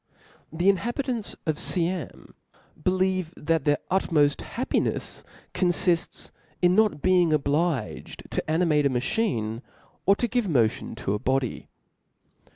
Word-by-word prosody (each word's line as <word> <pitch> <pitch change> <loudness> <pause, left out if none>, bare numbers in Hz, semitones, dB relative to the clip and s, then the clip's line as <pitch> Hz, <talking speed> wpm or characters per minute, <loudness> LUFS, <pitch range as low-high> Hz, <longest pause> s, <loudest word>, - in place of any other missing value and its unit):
The 170 +4 -1
inhabitants 235 +3 0
of 155 -2 -1
Siam 175 -4 -2 0.5
believe 185 -2 0
that 160 -1 0
their 145 -1 +3
ucmoft 150 -6 +2
happinefs - - -2 0.2
(') - - -27
confids 175 -1 0 0.3
in 180 0 +4
not 210 -6 +2
being 180 -2 +4
(a) - - +2
la - - +5
obliged 145 -3 -2
to - - -2
animate 155 -3 +3
a - - 0
machine, 125 - -1 0.5
or 200 - +6
to 240 - -1
give 240 -5 0
motion 120 -8 +1
^^lati^u - - -10
to 100 - +1
a 105 - -1
body. 130 +1 -1
170 Hz, 140 wpm, -26 LUFS, 145-185 Hz, 0.5 s, or